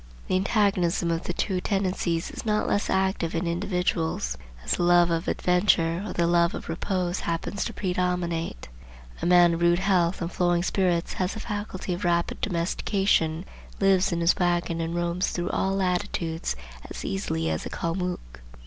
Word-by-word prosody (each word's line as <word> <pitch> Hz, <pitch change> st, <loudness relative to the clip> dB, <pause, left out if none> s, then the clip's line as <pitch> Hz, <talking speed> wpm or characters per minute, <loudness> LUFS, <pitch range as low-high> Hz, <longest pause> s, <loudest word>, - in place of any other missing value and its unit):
The -, -, +1 dB
antagonism 185 Hz, -3 st, +2 dB
of 165 Hz, +1 st, -2 dB
the 175 Hz, -, -2 dB
two 185 Hz, 0 st, -1 dB
tendencies 185 Hz, -4 st, -1 dB
is -, -, -7 dB
not 210 Hz, -1 st, +1 dB
less 205 Hz, -, 0 dB
active 190 Hz, -3 st, 0 dB
in 170 Hz, +2 st, -1 dB
individuals, 170 Hz, -, -1 dB, 0.3 s
as -, -, -3 dB
the -, -, +1 dB
love 175 Hz, 0 st, +5 dB
of 165 Hz, +1 st, -1 dB
adventure 180 Hz, -2 st, +2 dB
or 205 Hz, -, -5 dB
the 170 Hz, -, +1 dB
love 170 Hz, 0 st, +3 dB
of -, -, -7 dB
repose 180 Hz, +2 st, -1 dB
happens 170 Hz, +4 st, -2 dB
to -, -, -4 dB
predominate. 180 Hz, -, -2 dB, 0.5 s
A -, -, 0 dB
man 175 Hz, -1 st, +6 dB
of 165 Hz, -, -3 dB
rude 170 Hz, 0 st, +4 dB
health 185 Hz, -2 st, +2 dB
and 170 Hz, 0 st, -3 dB
flowing 175 Hz, -1 st, +1 dB
spirits 180 Hz, -2 st, 0 dB
has 185 Hz, +3 st, -1 dB
the -, -, -5 dB
faculty 205 Hz, -4 st, -4 dB
of 175 Hz, +3 st, -5 dB
rapid 170 Hz, -1 st, 0 dB
domestication, 170 Hz, -1 st, 0 dB, 0.3 s
lives 195 Hz, 0 st, +3 dB
in 170 Hz, 0 st, -1 dB
his 170 Hz, +1 st, +4 dB
wagon 175 Hz, -1 st, 0 dB
and 165 Hz, +1 st, -3 dB
roams 175 Hz, +1 st, 0 dB
through 175 Hz, +1 st, -2 dB
all 195 Hz, 0 st, 0 dB
latitudes 175 Hz, -, -1 dB, 0.3 s
as -, -, -7 dB
easily 80 Hz, -4 st, -1 dB
as 80 Hz, -, -3 dB
a -, -, -7 dB
Calmuc. 170 Hz, -, -4 dB
175 Hz, 170 wpm, -26 LUFS, 170-185 Hz, 0.5 s, man